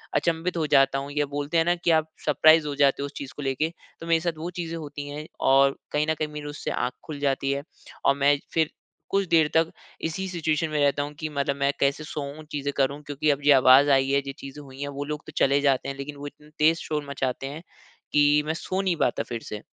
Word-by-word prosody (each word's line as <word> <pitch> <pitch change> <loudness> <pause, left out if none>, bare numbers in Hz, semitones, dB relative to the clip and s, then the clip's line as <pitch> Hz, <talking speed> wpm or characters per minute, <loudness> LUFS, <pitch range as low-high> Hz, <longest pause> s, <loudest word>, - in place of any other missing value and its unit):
अचंभित 170 +1 0
हो 160 - +1
जाता 135 0 +4
हूँ 140 +1 -6
या 150 0 0
बोलते 145 +3 -1
है 165 - +5
ना 175 +1 +2
कि 170 -1 0
आप 160 -1 +3 0.2
सरप्राइज़ 155 +1 +5
हो 145 - -2
जाते 140 -1 +3
हो 140 - -1
उस 145 - -7
चीज़ 140 -2 -7
को - - -7
लेके। 135 +3 0 0.3
तो 165 - -7
मेरे 165 -1 +3
साथ 170 -2 -2
वो 165 +3 -4
चीज़ें 165 -1 -3
होती 145 -2 -7
हैं 150 +1 -6 0.2
और 135 0 +5 0.2
कहीं 150 +1 +1
न - - +3
कहीं 155 - 0
मेरी 150 -1 -6
उससे 145 - -5
आँख 125 - -1
खुल 150 -3 -6
जाती 135 -1 0
है 140 0 -2 0.4
और 140 - +5
मैं 140 +1 +4 0.2
फिर 160 -2 +2 0.4
कुछ 195 0 +1
देर 160 -3 +5
तक 165 0 +2 0.4
इसी 190 +4 -4
सिचुएशन 160 -2 -1
में 150 - -1
रहता 145 0 +2
हूँ 145 +1 -7
कि 155 - -3
मतलब 140 -1 -1
मैं 140 0 +1
कैसे 140 +2 +1
सोऊँ 150 0 -6
चीज़ें 145 -1 -2
करूँ 140 +1 +1
क्योंकि 145 +1 -1
अब 140 - -2
ये 145 - +7
आवाज़ 130 +2 +7
आई 135 0 -1
है 140 0 +3
जो 135 0 -6
चीज़ें 140 +2 -9
हुई 135 0 -12
हैं, 145 - -2
वो 140 0 -4
लोग 150 +1 -5
तो - - -10
चले 140 +1 +3
जाते 135 -2 +1
हैं 140 - -4
लेकिन 145 +1 -6
वो 145 +1 -7
इतना 150 +1 -14
तेज 160 +2 +5
शोर 150 -2 -3
मचाते 135 -1 -2
हैं, 150 +4 -7 0.5
कि 145 0 +4
मैं 160 - -1
सो 185 +3 -2
नहीं 185 -3 +1
पाता 125 - 0
फिर 115 -1 -6
से। 105 0 -6
145 Hz, 250 wpm, -25 LUFS, 140-155 Hz, 0.5 s, ये